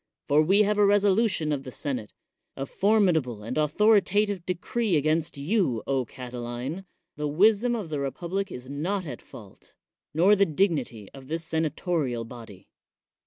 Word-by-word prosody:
For 145 +2 +4
we 195 +7 +4
have 210 0 +1
a - - +6
resolution 200 -5 +2
of 145 -2 -1
th 130 - -7
senate, 125 -8 -3 0.4
a 135 - -4
formidable 165 - +1
and 115 +4 -5
authoritative 205 +4 +2
decre 185 +2 0
against 155 +1 0
you, 145 - 0 0.2
Catiline; 125 +7 -6 0.3
the 150 0 -2
wiwiom 220 +8 +3
of 185 -7 -6
the 145 -2 -2
n 135 - -1
public 190 +5 -4
is 125 0 -8
not 175 +8 -2
at 130 -6 -7
fault, 105 -4 -15 0.4
nor 180 +7 +5
the 200 0 +3
dignity 145 - -1
of 135 -1 -12
thi 160 +3 -1
senatorial 160 -6 -2
body. 115 -5 -12
160 Hz, 150 wpm, -26 LUFS, 135-195 Hz, 0.4 s, a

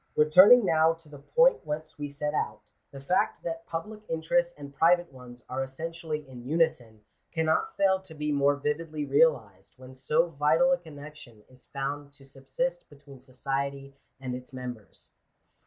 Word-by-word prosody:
Returning 185 +10 +7
now 160 -1 +4
to 165 -2 -18
the 145 -1 -12
point - - +3
whence 155 0 -6
we 145 0 -4
set 150 +1 -3
out, - - -4 0.2
the 140 - -10
fact 140 +7 0
that 165 0 -5
public 210 +6 -6
interests 170 +2 0
and 140 -1 -10
private 170 +1 +3
ones 125 -2 -13
are 130 +1 -3
essentially 155 +2 -5
in 125 -2 -11
unison, 135 -7 -1 0.3
can* 160 -1 -1
not 160 0 0
fail 190 -1 +3
to 180 -4 -14
be 150 0 -2
more 145 0 +3
vividly 150 +1 -3
realized, 125 - +1
when 130 0 -13
so 150 +6 +1
vital 155 - +3
a 270 - +2
connection 145 -8 -12
is 130 0 -22
found 140 +1 -5
to 140 -1 -16
subsist 135 +6 -4
between 140 -2 -15
society 135 +1 -4 0.2
and 130 -2 -5
its 125 +1 -8
members. 125 -4 -9
150 Hz, 165 wpm, -28 LUFS, 135-165 Hz, 0.3 s, Returning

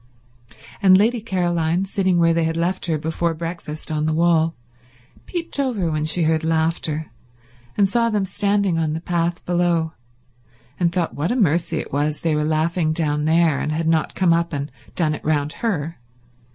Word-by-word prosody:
And 185 -1 +7
Lady 225 +3 +2
Caroline, 175 -3 0
sitting 190 -2 +1
where 165 -1 +4
they 165 0 +1
had 165 0 -1
left 180 +2 0
her 160 -2 +1
before 160 +2 -1
breakfast 165 -2 -5
on 155 0 0
the 155 - 0
wall, 165 -1 +2 0.7
peeped 335 -5 -4
over 220 -12 0
when 155 0 -1
she 165 +2 +2
heard 160 0 +1
laughter, 160 -2 -1 0.7
and 200 -2 +4
saw 230 +3 +1
them 210 -3 0
standing 200 -3 +1
on 155 -2 0
the 160 - -2
path 170 0 -2
below, 175 -2 +1 0.9
and 170 -2 +2
thought 175 -2 -1
what 155 +8 -1
a - - +1
mercy 170 - +1
it - - -5
was 145 +1 0
they 165 -2 +1
were 150 0 +1
laughing 155 +1 +1
down 150 -2 0
there 160 -2 +3
and 150 - -2
had 160 +1 -1
not 160 -1 +1
come 180 -3 +3
up 170 0 0
and 140 0 -3 0.2
done 155 -3 +1
it - - -7
round 150 -1 0
her. 165 - -2
165 Hz, 180 wpm, -21 LUFS, 155-180 Hz, 0.9 s, And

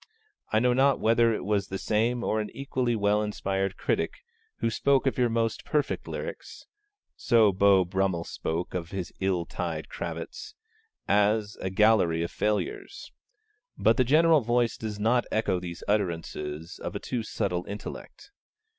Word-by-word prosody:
I 110 - +3
know 125 +2 +3
not 135 +2 +3
whether 115 +1 +4
it 105 - -3
was 100 -1 0
the 95 - -4
same 115 +5 0
or 110 - 0
an 105 - -5
equally 130 -3 -1
well 105 0 +2
inspired 95 -2 -2
critic, - - -2 0.3
who 115 - 0
spoke 140 +4 +2
of 135 - +1
your 120 -1 +3
most 115 -1 -1
perfect 150 -1 -1
lyrics - - -7 0.5
(so 115 -5 +4
Beau 95 -1 +4
Brummell 95 -1 0
spoke 85 +1 -4
of 85 -2 -4
his 90 -4 -5
ill 95 -3 0
tied - - -4
cravats) 435 -3 -6 0.5
as 105 0 +2
'a 95 - -3
gallery 95 -4 +4
of 85 - -4
your - - -20
failures.' 385 - -2 0.7
But - - +3
the 130 - +5
general 155 +4 +5
voice 120 0 +1
does 105 -2 -5
not 120 +3 +2
echo 100 -4 +1
these 85 -1 -7
utterances 85 -5 -2
of - - -5
a - - -2
too 125 - -3
subtle 90 -5 -2
intellect. 105 - -8
105 Hz, 160 wpm, -27 LUFS, 95-120 Hz, 0.7 s, the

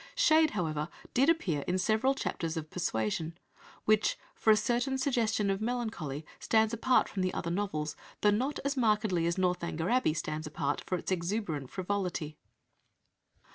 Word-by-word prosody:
Shade, 320 -11 +5
however, 155 -2 -1 0.2
did 270 +5 +4
appear 190 - +1
in 180 - +1
several 220 +8 +2
chapters 165 -9 -3
of 155 -1 -5
Persuasion, 160 - -2 0.5
which, 215 0 +3 0.2
for - - 0
a 215 - +8
certain 245 +4 0
suggestion 225 -6 +1
of 195 +1 -2
melancholy, 220 - -3
stands 220 0 +2
apart 250 +3 +3
from 195 - -3
the 185 0 +1
other 170 - -2
novels, 170 -6 -2 0.3
though 210 - +5
not 255 +8 0
as 280 0 0
markedly 210 -8 +2
as 170 - 0
Northanger 180 -1 0
Abbey 245 -11 +3
stands 155 0 -3
apart 145 -1 -2
for 185 - 0
its 175 - -5
exuberant 170 - -2
frivolity. 180 -5 -3
195 Hz, 155 wpm, -31 LUFS, 165-230 Hz, 0.5 s, a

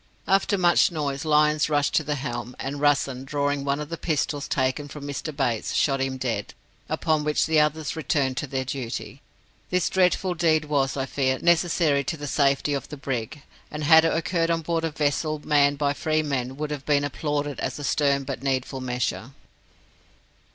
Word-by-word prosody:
After 195 +1 +2
much 175 0 +4
noise, 145 -3 -3
Lyons 150 0 +3
rushed 145 -1 +1
to 155 - +3
the 150 0 -2
helm, 120 -3 -5
and 140 +2 -4
Russen, 140 -3 +1
drawing 145 0 -1
one 140 +1 0
of 150 0 -5
the 165 - -5
pistols 150 -2 -1
taken 130 +2 -1
from 145 0 -9
Mr. 145 +2 -4
Bates, 125 -6 -1
shot 135 -2 +2
him 135 0 -1
dead, 120 -5 -3 0.3
upon 155 -2 0
which 150 0 +1
the 160 -1 +3
others 150 0 0
returned 140 -4 0
to 150 - -2
their 130 0 -2
duty. 130 +1 -5 0.5
This 180 -2 +1
dreadful 185 0 +2
deed 160 -2 +2
was, 140 -2 0
I 135 - -1
fear, 130 -1 0
necessary 165 -4 +2
to 160 - -3
the 145 - -6
safety 140 0 +1
of 140 - -4
the 150 - -7
brig; 135 +1 -4 0.3
and 150 0 -5
had 160 +2 +7
it 165 - +2
occurred 165 0 0
on 165 -1 0
board 165 +1 -1
a - - 0
vessel 155 +1 -1
manned 145 -1 +3
by 140 0 +1
free 155 +1 0
men, 130 -3 -3
would 150 0 -3
have 145 -2 -5
been 145 -1 +3
applauded 145 0 -2
as 130 - -3
a 145 - -7
stern 140 -1 +1
but 135 -2 -5
needful 135 0 -2
measure. 125 -2 -3
145 Hz, 190 wpm, -25 LUFS, 135-155 Hz, 0.5 s, had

